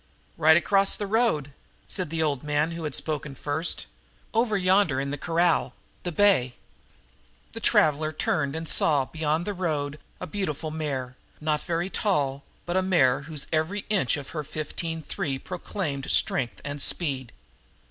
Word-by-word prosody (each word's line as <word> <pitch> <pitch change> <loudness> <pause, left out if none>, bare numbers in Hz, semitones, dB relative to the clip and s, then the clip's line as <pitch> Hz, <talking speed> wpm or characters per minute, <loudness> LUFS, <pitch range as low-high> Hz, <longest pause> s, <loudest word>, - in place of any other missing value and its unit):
"Right 160 0 +6
across 195 +2 +3
the 205 - -3
road," 200 - +1 0.3
said - - -3
the 160 0 -1
old 145 -4 0
man 150 +2 0
who 165 -1 -5
had 150 - 0
spoken 150 -3 -1
first. 150 +5 0 0.5
"Over 225 -2 +2
yonder 185 -6 +3
in 140 0 -2
the - - -1
corral 165 -6 +1 0.3
the 175 - -3
bay." 155 -10 +3 1.0
The - - -7
traveler 155 0 +3
turned 150 -1 -1
and 165 0 -4
saw, 145 -4 +4
beyond 160 +3 -1
the 205 - -2
road, 150 -5 -2 0.2
a - - -4
beautiful 155 -4 -3
mare, 135 -5 -4 0.2
not 150 -1 0
very 175 +1 -2
tall, 140 -9 0 0.2
but 175 - -2
a 190 - +4
mare 150 -8 +3
whose 150 -3 -2
every 160 +6 0
inch 180 - +2
of 140 -2 -8
her 155 -2 -4
fifteen 160 +2 -5
three 135 -2 -3
proclaimed 160 -4 -4
strength 120 -3 +1
and 145 0 -4
speed. 135 -8 +1
155 Hz, 155 wpm, -26 LUFS, 140-175 Hz, 1.0 s, Right